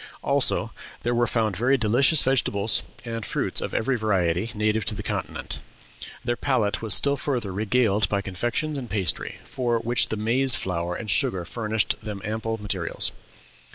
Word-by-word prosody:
Also, - - +2 0.3
there 120 - +1
were 120 0 +2
found 110 -4 0
very 125 +7 +2
delicious 130 +7 +4
vegetables 115 -5 +2 0.2
and 115 -1 -4
fruits - - 0
of - - -3
every 130 +3 0
variety 95 -3 0
native 105 +1 +1
to - - 0
the - - -4
continent. - - -4 0.7
Their 120 - +1
palate 115 -7 0
was 110 -2 +4
still 140 0 +4
further 125 -8 -2
regaled 105 -1 +2
by 100 -1 0
confections 120 +10 -2
and 125 -3 -8
pastry, 95 -5 -1
for 120 -2 -1
which 120 +2 +2
their 110 - -2
maize 120 +4 +3
flower 90 -1 -2
and 110 0 -3
sugar 90 -2 +1
furnished 110 +2 -1
them 105 -2 -6
ample 110 +1 -2
materials. 100 -5 -1
110 Hz, 160 wpm, -25 LUFS, 100-120 Hz, 0.7 s, delicious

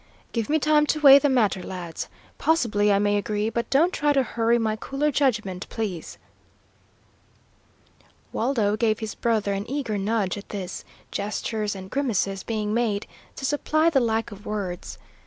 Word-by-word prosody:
"Give 230 0 -2
me 310 - +3
time 300 0 +3
to 305 - +1
weigh 280 -2 +9
the 290 - +2
matter, 220 -8 +2
lads. 175 -2 -6 0.3
Possibly 210 -10 +2
I 200 - +4
may 205 0 +2
agree, 210 +2 -1
but 235 +1 -2
don't 325 +7 +3
try 295 0 +2
to 270 -2 +3
hurry 235 -1 +1
my 220 -2 0
cooler 275 +6 -1
judgment, 215 -10 0
please." 200 -8 -4 2.2
Waldo 225 -4 +1
gave 215 -1 +1
his 220 -2 -5
brother 215 -4 0
an 200 +2 -4
eager 255 -7 -2
nudge 205 -1 0
at 200 - -14
this, 190 -3 -5 0.3
gestures 210 0 -2
and 190 0 -9
grimaces 210 -8 0
being 215 -1 -2
made 220 -3 0 0.3
to 270 - -5
supply 310 +3 +2
the 275 - +4
lack 225 -1 0
of 205 0 -11
words. 200 -5 -4
220 Hz, 160 wpm, -25 LUFS, 205-270 Hz, 2.2 s, weigh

